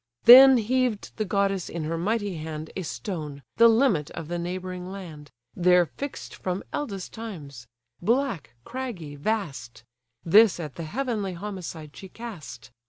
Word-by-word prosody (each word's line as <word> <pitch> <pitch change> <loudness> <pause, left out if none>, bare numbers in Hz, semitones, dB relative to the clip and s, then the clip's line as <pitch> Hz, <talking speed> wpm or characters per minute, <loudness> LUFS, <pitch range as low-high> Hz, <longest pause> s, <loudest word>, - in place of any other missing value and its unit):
Then 260 +2 +10
heaved 245 -1 -1
the 215 - -1
goddess 195 -2 0
in 165 -2 -4
her 160 +2 -2
mighty 205 +1 -1
hand 155 0 -6
A 190 - -3
stone, 155 - -6
the 230 +1 +8
limit 225 - +3
of 165 -2 -8
the 175 0 -2
neighbouring 180 +1 -5
land, 160 -7 -9 0.3
There 180 0 +4
fix'd 280 - -7
from 185 +1 -4
eldest 200 -11 -4
times; 150 - -8 0.3
black, 195 - -1
craggy, 225 - -6
vast; 140 - -3 0.4
This 205 +2 +6
at 150 -5 -6
the 165 - -6
heavenly 215 - -2
homicide 170 -5 -7
she 190 - -10
cast. 155 - -9
185 Hz, 145 wpm, -26 LUFS, 155-220 Hz, 0.4 s, Then